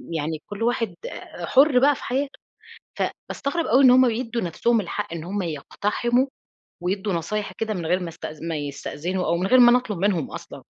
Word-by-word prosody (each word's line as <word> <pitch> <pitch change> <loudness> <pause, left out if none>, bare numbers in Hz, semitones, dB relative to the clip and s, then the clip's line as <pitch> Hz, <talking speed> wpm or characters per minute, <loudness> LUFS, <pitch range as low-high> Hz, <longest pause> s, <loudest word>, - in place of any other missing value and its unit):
يعني 155 0 -2
كل 205 +2 -4
واحد 230 -6 0
آآ 175 - -7
حُر 270 - +5
بقى 285 +2 +4
في - - -10
حياته. 275 +2 -2 0.6
فباستغرب 320 +4 -3
أوي 260 +4 +4
إن 250 - +8
هُم 255 0 +6
بيدوا 230 0 -2
نفسهم 220 +7 +1
الحق 170 -2 -4
إن 160 -2 -5
هُم 195 +3 -3
يقتحموا، 210 - 0 0.5
ويدُوا 190 +2 -1
نصايح 205 +5 -2
كده 220 -1 -1
من 170 -3 -4
غير 180 +3 +2
ما 175 - -4
است 165 - -7 0.2
ما 165 -1 -2
يستأذنوا، 150 +5 -3
أو 170 - +1
من 180 +2 -1
غير 255 +5 +5
ما 240 -1 +8
أنا 250 - +6
أطلب 210 -7 -5
منهم 185 -6 0
أصلًا. - - -9
205 Hz, 195 wpm, -24 LUFS, 170-245 Hz, 0.6 s, إن